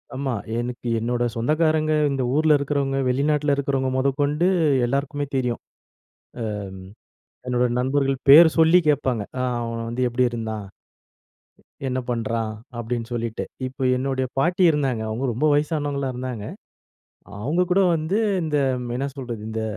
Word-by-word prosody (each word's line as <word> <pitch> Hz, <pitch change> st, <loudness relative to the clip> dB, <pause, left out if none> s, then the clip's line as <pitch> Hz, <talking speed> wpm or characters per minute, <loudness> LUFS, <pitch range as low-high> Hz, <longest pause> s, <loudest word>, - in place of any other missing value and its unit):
ஆமா, 135 Hz, -2 st, -2 dB, 0.3 s
எனக்கு 120 Hz, 0 st, -5 dB
என்னோட 120 Hz, +1 st, -1 dB
சொந்தக்காரங்க, 155 Hz, +5 st, +1 dB, 0.2 s
இந்த 135 Hz, -2 st, -1 dB
ஊர்ல 155 Hz, -1 st, +4 dB
இருக்கிறவுங்க, 140 Hz, -1 st, -1 dB
வெளிநாட்டுல 145 Hz, +2 st, +1 dB
இருக்கிறவுங்க 135 Hz, -2 st, -1 dB
மொதக்கொண்டு 145 Hz, +5 st, +1 dB, 0.4 s
எல்லாருக்குமே 140 Hz, +3 st, -1 dB
தெரியும். 125 Hz, -3 st, -1 dB, 0.9 s
அ -, -, -4 dB, 0.2 s
ம், 95 Hz, 0 st, -11 dB, 0.6 s
என்னோட 125 Hz, 0 st, +2 dB
நண்பர்கள் 135 Hz, +1 st, +1 dB
பேர் 160 Hz, +3 st, +10 dB
சொல்லி 165 Hz, +2 st, +6 dB
கேட்பாங்க. 130 Hz, -7 st, +1 dB, 0.2 s
"அ -, -, 0 dB, 0.2 s
அவன் 115 Hz, 0 st, -4 dB
வந்து 125 Hz, +2 st, -1 dB
எப்டி 125 Hz, +1 st, +1 dB
இருந்தான்? 110 Hz, -3 st, -4 dB, 1.2 s
என்ன 130 Hz, +1 st, -1 dB
பண்றான்?" 115 Hz, -1 st, -2 dB, 0.3 s
அப்டீன்னு 120 Hz, 0 st, -4 dB
சொல்லிட்டு. 115 Hz, -1 st, -3 dB, 0.2 s
இப்போ 130 Hz, +1 st, -6 dB
என்னுடைய 130 Hz, 0 st, -1 dB
பாட்டி 175 Hz, +5 st, +2 dB
இருந்தாங்க. 135 Hz, -6 st, -1 dB
அவங்க 115 Hz, +5 st, -3 dB
ரொம்ப 130 Hz, +7 st, 0 dB
வயசானவங்களா 145 Hz, -2 st, -1 dB
இருந்தாங்க. 125 Hz, -4 st, -5 dB, 1.0 s
அவங்க 155 Hz, +8 st, 0 dB
கூட 195 Hz, -, +4 dB, 0.2 s
வந்து 160 Hz, +5 st, -1 dB, 0.3 s
இந்த, 150 Hz, -2 st, -1 dB, 0.4 s
என்ன 135 Hz, +2 st, -1 dB
சொல்றது? 120 Hz, -5 st, -6 dB
இந்த 110 Hz, 0 st, -3 dB
135 Hz, 130 wpm, -23 LUFS, 120-145 Hz, 1.2 s, பேர்